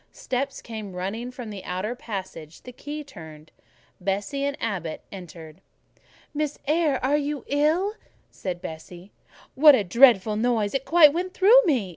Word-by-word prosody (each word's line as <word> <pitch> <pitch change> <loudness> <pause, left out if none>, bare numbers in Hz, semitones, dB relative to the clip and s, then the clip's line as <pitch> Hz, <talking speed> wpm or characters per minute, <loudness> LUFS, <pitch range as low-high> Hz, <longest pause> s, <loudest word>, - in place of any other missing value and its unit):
Steps 270 +2 -4
came 215 -4 -7
running 210 +7 -4
along 235 -4 -7
the 195 -2 -8
outer 185 +6 -3
passage; 190 -9 -8
the 250 - -10
key 295 +4 -7
turned, 160 - -13 0.5
Bessie 200 +9 -2
and 280 0 -2
Abbot 185 -8 -4
entered. 170 -3 -11 0.7
"Miss 300 -1 -2
Eyre, 300 -2 +1
are 285 +3 +2
you 290 -1 -3
ill?" 315 +8 +1 0.4
said 180 -1 -6
Bessie. 175 +3 -9 0.4
"What 295 +1 +7
a 215 - 0
dreadful 215 0 +4
noise! 220 -3 0
it 270 +2 -4
went 320 -4 +7
quite 365 +2 -3
through 445 +7 +7
me!" 260 - +1
235 Hz, 150 wpm, -24 LUFS, 185-290 Hz, 0.7 s, What